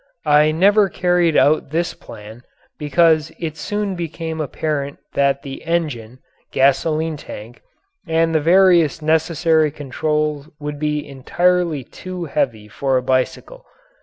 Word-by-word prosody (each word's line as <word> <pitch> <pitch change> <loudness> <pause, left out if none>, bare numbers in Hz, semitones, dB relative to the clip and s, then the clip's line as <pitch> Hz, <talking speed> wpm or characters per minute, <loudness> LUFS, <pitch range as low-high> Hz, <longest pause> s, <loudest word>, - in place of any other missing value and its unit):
I 150 +1 +4
never 200 +5 +4
carried 175 -3 +1
out 150 -1 +3
this 170 +3 -1
plan 110 +3 -12 0.4
because 155 +1 +2
it 160 -3 -5
soon 205 +5 -3
became 165 -2 -5
apparent 145 -1 -3 0.2
that 140 0 +1
the 135 -2 -8
engine, 145 -9 -3 0.3
gasoline 155 +4 +1
tank, 115 -3 -10 0.5
and 165 0 +1
the 160 - +3
various 170 -2 +4
necessary 160 0 +2
controls 150 +1 -2
would 145 -1 -6
be 150 -1 -2
entirely 170 +3 0
too 185 +6 -7
heavy 115 -8 -2
for 135 +4 -1
a 125 - -1
bicycle. 130 - -2
155 Hz, 125 wpm, -19 LUFS, 140-170 Hz, 0.5 s, I